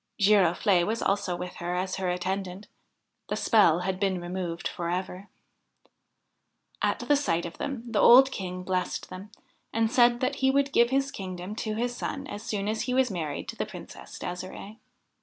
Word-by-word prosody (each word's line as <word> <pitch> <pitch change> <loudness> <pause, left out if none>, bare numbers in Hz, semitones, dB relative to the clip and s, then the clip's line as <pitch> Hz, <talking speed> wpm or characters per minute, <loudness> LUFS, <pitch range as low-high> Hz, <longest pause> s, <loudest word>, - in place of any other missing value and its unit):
Girofle'e 195 -2 +4
was 220 +5 -1
also 195 -2 0
with 180 +1 -6
her 175 +1 -3
as 185 +1 -2
her 190 -1 -1
attendant. 185 +2 -3 0.6
The - - 0
spell 180 -7 +4
had 185 0 -2
been 195 -2 0
removed 175 -1 -4
for 170 -1 -4
ever. 185 +2 -4 1.5
At - - 0
sight 170 - 0
of 170 - -8
them 270 -5 -4
the 225 -3 0
old 265 +2 +8
King 180 -3 -5
blessed 180 0 -2
them, 190 +3 -8 0.4
and 225 0 +1
said 240 -1 +4
that 260 +2 -1
he 265 - +3
would 275 +1 +2
give 235 0 +5
his 275 +1 +1
kingdom 185 +1 -6
to 215 -3 -2
his 240 +2 -1
son 275 +2 -4
as 205 -5 -7
soon 205 -3 -3
as 215 +1 -1
he 250 +1 -1
was 260 -3 +3
married 155 -6 -4
to - - -5
the - - -3
Princess - - -10
De'sire'e. 185 +4 -7
195 Hz, 175 wpm, -27 LUFS, 180-235 Hz, 1.5 s, old